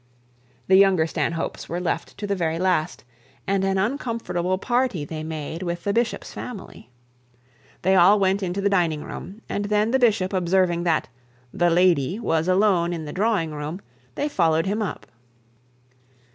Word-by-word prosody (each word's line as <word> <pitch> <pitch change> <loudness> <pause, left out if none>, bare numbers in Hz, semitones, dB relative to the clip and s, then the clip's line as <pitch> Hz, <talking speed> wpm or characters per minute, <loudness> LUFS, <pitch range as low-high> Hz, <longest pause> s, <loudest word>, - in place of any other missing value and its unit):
The 190 - +5
younger 190 -4 +5
Stanhopes 165 0 -3
were 175 - -2
left 180 -2 -3
to 205 - -4
the 200 - -1
very 165 -3 -1
last, 175 -2 0 0.4
and 195 0 0
an 195 0 +1
uncomfortable 210 -5 -1
party 240 - 0
they 155 +1 -6
made 160 +1 -5
with 170 -1 -4
the 200 - 0
bishop's 235 +1 -1
family. 195 - -9 0.9
They 190 +2 +3
all 190 +3 +6
went 195 +1 +2
into 185 +1 -2
the 200 - +2
dining 165 -6 +1
room, 210 +4 -9
and 205 - -2
then 210 +2 +1
the 265 - +3
bishop 205 -6 +2
observing 180 -1 +1
that 165 -3 +1 0.5
the 175 0 +2
'lady' 175 -1 +3
was 165 -6 0
alone 185 -2 +3
in 160 -2 -5
the 150 - -7
drawing 195 -5 0
room, 150 +4 -5 0.4
they 290 - -1
followed 165 - +2
him 205 +3 -1
up. 205 - -4
185 Hz, 160 wpm, -23 LUFS, 170-205 Hz, 0.9 s, all